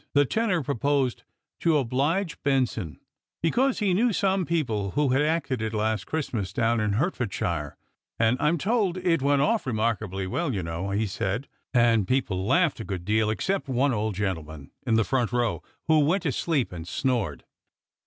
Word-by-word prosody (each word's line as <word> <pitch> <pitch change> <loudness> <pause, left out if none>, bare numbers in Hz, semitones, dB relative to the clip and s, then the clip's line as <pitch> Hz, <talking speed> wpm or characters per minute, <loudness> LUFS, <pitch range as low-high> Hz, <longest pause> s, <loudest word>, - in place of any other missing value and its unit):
The 145 0 +5
tenor 195 - 0
proposed 140 -1 0 0.4
To 165 - +2
ohlif/e 150 +7 +1
Benson, 125 - 0 0.4
because 255 +10 +2
he 200 -4 +1
knew 230 +6 +3
some 195 -2 +1
people 115 -12 0
who 145 -2 +3
had 130 +3 +3
acted 150 -5 0
it 110 0 -2
last 110 0 -1
Christmas 120 - -2
down 115 +2 +1
in 105 -1 0
Hertfordshire; 100 - -2 0.2
" - - -66
and 115 +1 +3
I'm 150 +3 +2
told 195 +1 +1
it 170 -4 +1
went 140 0 +3
off 225 -6 +1
remarkably 110 -5 -1
well, 135 - -1
you 95 - -2
know," 85 +4 -3
he 100 +3 0
said; 100 +5 -2 0.2
" - - -66
and 115 -4 +4
people 100 -7 0
laughed 165 +2 +3
a - - -4
good 95 -4 -5
deal, 110 +1 +2
except 190 - -1
one 130 +1 +2
old 110 -2 -1
gentleman 80 -7 -4 0.2
in 115 - +3
the 115 - +4
front 125 0 0
row, 120 -2 0 0.3
who 160 -1 +5
went 165 +6 +2
to - - +1
sleep 150 -7 0
and 85 -2 -7
snored." 105 - -1
125 Hz, 180 wpm, -26 LUFS, 105-160 Hz, 0.4 s, The